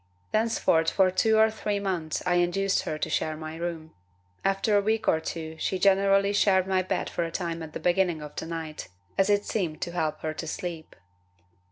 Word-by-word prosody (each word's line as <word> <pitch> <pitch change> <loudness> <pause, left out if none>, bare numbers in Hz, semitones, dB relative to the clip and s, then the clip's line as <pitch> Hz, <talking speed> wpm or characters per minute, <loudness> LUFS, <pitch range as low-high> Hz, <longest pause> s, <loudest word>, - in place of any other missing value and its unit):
Thenceforth 215 -7 +2
for 190 -2 +3
two 220 +4 +3
or 220 0 +5
three 210 -2 -2
months 180 -6 -2
I 175 -1 +2
induced 190 +3 +1
her 155 - -2
to 155 - -2
share 155 0 -1
my 155 0 -7
room. 165 -1 -5 0.5
After 195 +2 +2
a 205 - +5
week 220 +2 0
or 160 - +4
two 160 0 -6
she 190 - -1
generally 195 +1 +4
shared 190 -2 +3
my 190 -1 +1
bed 185 - -2
for 170 - -2
a 165 - -3
time 170 -1 -3
at 155 -1 -8
the - - -4
beginning 175 -2 +1
of 150 0 -9
the - - -5
night, 160 -2 -5 0.3
as 195 +1 +2
it 205 0 +2
seemed 175 -8 -2
to 175 - -3
help 155 -3 -2
her 155 0 -2
to 160 - -6
sleep. 165 -1 -6
175 Hz, 205 wpm, -27 LUFS, 160-195 Hz, 0.5 s, or